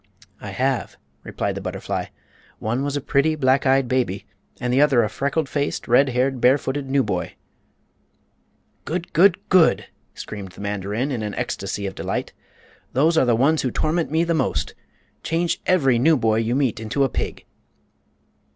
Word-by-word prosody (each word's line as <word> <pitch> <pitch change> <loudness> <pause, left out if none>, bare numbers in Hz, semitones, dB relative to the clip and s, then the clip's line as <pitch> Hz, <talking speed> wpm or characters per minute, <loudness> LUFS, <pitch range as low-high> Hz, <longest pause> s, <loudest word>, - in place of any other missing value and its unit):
"I 100 - -7
have," 130 +6 -1 0.2
replied - - -3
the - - -6
butterfly. - - -4 0.5
"One 120 +5 -2
was 145 0 -1
a - - -3
pretty, 150 +4 +1
black 135 -1 +2
eyed 135 -1 +3
baby, 120 -7 -1 0.3
and 125 -1 -1
the 135 - +4
other 135 -5 +4
a 105 - -1
freckle 140 +7 -1
faced, 145 +1 -3
red 130 +3 +4
haired, 130 0 0
barefooted 135 +1 +1
newboy." 105 -11 0 1.5
"Good! 170 +2 -4
Good! 180 +1 +5
Good!" 180 -3 +4 0.3
screamed 100 -3 -8
the 90 - -11
mandarin, 105 +6 -2
in 120 -4 -2
an 105 -1 -4
ecstasy 100 +1 -3
of 95 - -4
delight. - - -4 0.6
"Those 155 +7 +3
are 160 - +4
the 120 -2 +3
ones 145 +7 +3
who 130 - -1
torment 160 +6 -1
me 160 +3 +1
the 170 0 0
most! 160 - -1 0.5
Change 170 +1 -1
every 135 -10 +3
newboy 120 -7 +3
you 115 +2 0
meet 130 -6 0
into 110 +6 -1
a - - +3
pig!" - - -5
130 Hz, 160 wpm, -22 LUFS, 115-145 Hz, 1.5 s, Good